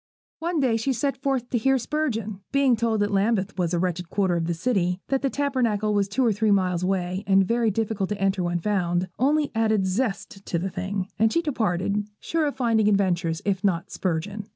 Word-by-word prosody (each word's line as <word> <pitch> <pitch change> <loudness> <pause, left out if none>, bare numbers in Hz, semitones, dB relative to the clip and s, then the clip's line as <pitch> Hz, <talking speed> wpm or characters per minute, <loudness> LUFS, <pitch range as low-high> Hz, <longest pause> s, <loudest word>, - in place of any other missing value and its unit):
One 335 0 -1
day 250 -5 +2
she 260 +4 0
set 275 +3 -1
forth 265 -3 -1
to 240 - +1
hear 270 +4 +3
Spurgeon. 235 -7 -2
Being 275 -3 +4
told 225 -1 0
that 205 0 +1
Lambeth 200 0 +1
was 175 -2 +1
a 175 - +1
wretched 180 -1 -2
quarter 190 -3 +1
of 165 -1 -1
the 170 - -1
city, 180 -2 0
that 270 -1 +1
the 275 - +1
Tabernacle 240 -7 0
was 200 -1 +2
two 235 +6 0
or 225 - +3
three 215 +2 +1
miles 185 -3 +2
away, 185 0 -1
and 195 -1 +4
very 235 0 +2
difficult 210 -2 -1
to 210 - -3
enter 195 0 +1
when 175 0 0
found, 180 -1 0
only 290 +3 +2
added 220 -3 +2
zest 195 -1 -2
to 170 - 0
the 185 +3 -3
thing, 190 +1 -3
and 220 0 +4
she 335 - +1
departed, 205 - -1
sure 325 -2 0
of 285 - -3
finding 225 -4 +2
adventures, 180 -5 +1
if 200 0 0
not 180 -2 0
Spurgeon. 195 +4 -3
205 Hz, 210 wpm, -25 LUFS, 185-240 Hz, -, Being